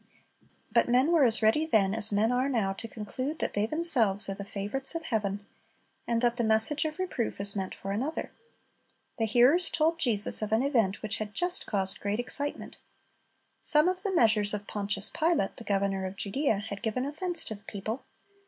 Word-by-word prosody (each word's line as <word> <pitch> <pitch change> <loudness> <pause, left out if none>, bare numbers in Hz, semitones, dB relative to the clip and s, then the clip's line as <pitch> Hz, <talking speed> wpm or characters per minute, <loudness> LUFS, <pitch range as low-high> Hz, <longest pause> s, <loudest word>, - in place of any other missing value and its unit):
But 235 0 +2
men 255 +6 +3
were 330 -4 +4
as 230 -1 +3
ready 220 +9 +3
then 210 -11 +1
as 220 -1 0
men 210 +3 +1
are 255 +2 0
now 215 -7 -1
to 225 +4 -8
conclude 255 +8 -6
that - - -3
they 205 +1 0
themselves 245 - +2
are - - -2
the 200 +1 -8
favorites 205 +9 -4
of 330 - -4
heaven, 205 -5 -3 0.6
and 235 0 -1
that 240 0 +1
the 240 - 0
message 220 +8 +4
of 310 +1 -4
reproof 360 - -4
is 200 +1 +1
meant 190 -2 -4
for 195 - -7
another. 260 +10 -4 0.9
The 225 - +1
hearers 255 - +4
told 325 +1 0
Jesus 220 -7 +2
of 215 -1 -4
an 220 +3 +2
event 225 -9 0
which 215 0 0
had 210 -1 -7
just 360 0 +3
caused 195 -2 -1
great 205 +2 -3
excitement. 285 +4 -4 0.8
Some 300 +2 +7
of 370 0 -1
the 390 -2 -3
measures 215 -6 +2
of 205 0 -7
Pontius 200 -1 -2
Pilate, 315 - -1
the - - -9
governor 195 -2 -1
of 185 - -9
Judea, 220 +4 -1
had 200 -1 -7
given 245 +3 -2
offense 330 +4 0
to - - -5
the 205 0 -14
people. 215 +4 -6
225 Hz, 195 wpm, -28 LUFS, 205-285 Hz, 0.9 s, Some